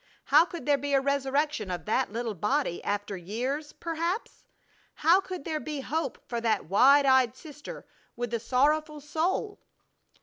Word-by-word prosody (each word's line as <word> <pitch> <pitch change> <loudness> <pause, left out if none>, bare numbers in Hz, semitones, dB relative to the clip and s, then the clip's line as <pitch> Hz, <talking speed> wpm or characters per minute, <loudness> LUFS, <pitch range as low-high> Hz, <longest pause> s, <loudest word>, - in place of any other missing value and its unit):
How 330 - +5
could 340 -2 -8
there 285 -1 +3
be 285 +1 0
a - - +5
resurrection 280 -3 0
of 180 -1 -4
that 225 +2 0
little 230 0 -3
body 210 - -1
after 205 0 -2
years, 250 - -4
perhaps? 335 +5 -4 0.5
How 335 +5 +4
could 365 -5 -7
there 315 -2 -2
be 300 -2 -5
hope 300 -1 -3
for 235 -1 -3
that 225 -1 +1
wide 275 - +5
eyed 260 -3 +4
sister 295 +1 -10 0.3
with 240 -1 -4
the 235 - -1
sorrowful 300 +6 +1
soul? 325 +8 -2
280 Hz, 160 wpm, -28 LUFS, 235-310 Hz, 0.5 s, How